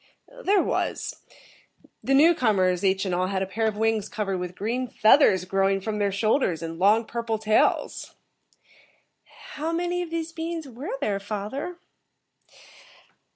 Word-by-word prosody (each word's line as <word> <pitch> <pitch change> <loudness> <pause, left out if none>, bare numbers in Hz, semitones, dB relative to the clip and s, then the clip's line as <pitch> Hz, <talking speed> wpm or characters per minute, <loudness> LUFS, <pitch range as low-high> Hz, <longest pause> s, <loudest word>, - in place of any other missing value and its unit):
"There 395 0 +3
was. - - -3 0.8
The 270 - +2
newcomers, 215 - +3
each 190 0 +1
and 185 - -2
all, 180 +1 0
had 190 0 -1
a - - -2
pair 220 +4 -1
of 210 -1 -2
wings 220 -1 0
covered 195 -3 -2
with 180 0 -5
green 240 +6 -2
feathers 215 - +4
growing 195 +1 +1
from 210 +2 -4
their 200 -1 +1
shoulders, 200 - +1
and 165 0 -6
long, 210 +4 +4
purple 230 -1 -3
tails." 215 0 0 1.4
"How 310 +2 -3
many 350 +1 -1
of 350 - -5
these 330 0 -3
beings 330 -1 -5
were 280 - -6
there, 200 -1 0
father?" 215 - -5
215 Hz, 145 wpm, -25 LUFS, 195-285 Hz, 1.4 s, feathers